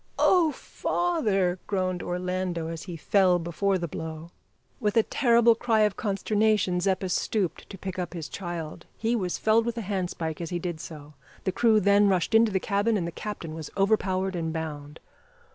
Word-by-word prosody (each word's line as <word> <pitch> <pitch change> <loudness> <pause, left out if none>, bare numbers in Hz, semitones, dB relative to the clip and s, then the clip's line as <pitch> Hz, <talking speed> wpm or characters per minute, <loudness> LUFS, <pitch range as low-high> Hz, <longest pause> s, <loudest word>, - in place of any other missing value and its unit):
"Oh! 345 -4 +4
father," 210 - 0
groaned 185 -3 -1
Orlando, 180 -2 -2
as 165 -1 -5
he 175 -4 -6
fell 185 +2 +3
before 175 +3 0
the 170 -1 -3
blow. 160 +1 -7 0.5
With 210 -2 0
a 225 - +6
terrible 235 -2 +4
cry 225 -1 +1
of 210 -2 +2
consternation 210 -2 +1
Zeppa 190 +1 0
stooped 185 0 -1
to 195 - -8
pick 190 0 -5
up 180 -1 -4
his 165 -2 -5
child. 170 -3 -6
He 230 +2 0
was 185 -6 -1
felled 225 +1 +3
with 235 0 -2
a - - -1
handspike 180 -5 -3
as 165 - -4
he 175 - -2
did 175 -2 -4
so; 150 -2 -9 0.3
the 190 - 0
crew 220 +2 +4
then 200 +1 +4
rushed 185 +2 +1
into 225 -1 +5
the 190 - +1
cabin 205 +3 +1
and 175 - -2
the 170 - -4
captain 175 -4 -6
was 160 -2 -7
overpowered 190 -2 +1
and 165 -2 -2
bound. 150 -2 -6
185 Hz, 180 wpm, -27 LUFS, 170-215 Hz, 0.5 s, a